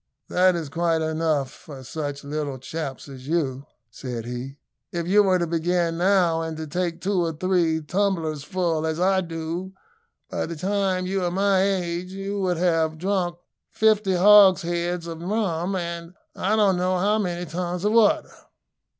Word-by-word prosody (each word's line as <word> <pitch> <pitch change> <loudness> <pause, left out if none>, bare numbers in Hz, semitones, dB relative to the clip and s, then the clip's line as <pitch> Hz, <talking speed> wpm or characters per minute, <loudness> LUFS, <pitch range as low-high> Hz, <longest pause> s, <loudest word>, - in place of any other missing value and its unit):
"That 185 0 +4
is 165 -3 -3
quite 165 +1 0
enough 155 -4 0
for 135 -4 -11
such 145 +1 -5
little 145 -1 -3
chaps 135 +1 -6
as 135 -1 -11
you," 145 -4 -1 0.2
said 120 -2 -6
he. 125 +3 -6 0.3
"If 170 -1 -3
you 205 +3 +5
were 190 -2 +3
to 175 - 0
begin 170 0 0
now, 180 -3 +3
and 160 -1 -4
to 160 - -5
take 170 +2 -3
two 190 -2 +1
or 165 -1 -1
three 170 -1 +1
tumblersful 165 -2 -1
as 160 +1 -2
I 190 +1 +3
do, 170 +2 -5 0.5
by - - -3
the 170 - -5
time 190 +1 0
you 190 0 -1
are 175 - +1
my 195 +1 +2
age, 180 -2 -1
you 195 +1 -4
would 180 -2 0
have 165 -2 +1
drunk 180 0 -1 0.3
fifty 215 -3 +2
hogsheads 180 -3 +5
of 165 -1 -7
rum, 190 -2 -1
and 170 0 -5 0.2
I 205 +3 +1
don't 200 -4 +3
know 185 +1 +1
how 205 +4 +2
many 180 -3 -2
tons 175 +3 -3
of 210 - +3
water." 225 -2 +3
175 Hz, 165 wpm, -24 LUFS, 160-190 Hz, 0.5 s, you